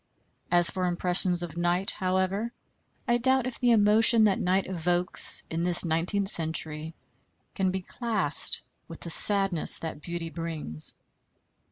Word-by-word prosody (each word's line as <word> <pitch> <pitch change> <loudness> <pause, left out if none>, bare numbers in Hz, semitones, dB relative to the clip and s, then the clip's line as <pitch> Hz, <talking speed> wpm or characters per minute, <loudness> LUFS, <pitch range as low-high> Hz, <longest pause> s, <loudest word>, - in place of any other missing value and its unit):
As 175 -1 +3
for 185 -1 -4
impressions 175 0 0
of 170 -2 -10
night, 175 +2 -2
however, 190 +4 -4 0.6
I 240 0 0
doubt 260 0 0
if 255 -2 -8
the 245 - 0
emotion 220 +1 +3
that 205 -3 0
night 185 +2 -2
evokes 175 0 +2
in 165 +1 -4
this 175 0 +3
nineteenth 175 +5 -3
century 160 -1 -4 0.6
can 190 -2 -2
be 190 +1 -5
classed 210 - -1 0.2
with 165 - -12
the 170 - -4
sadness 195 -3 +6
that 160 -2 -9
beauty 170 0 -8
brings. 160 - -5
180 Hz, 140 wpm, -25 LUFS, 165-200 Hz, 0.6 s, sadness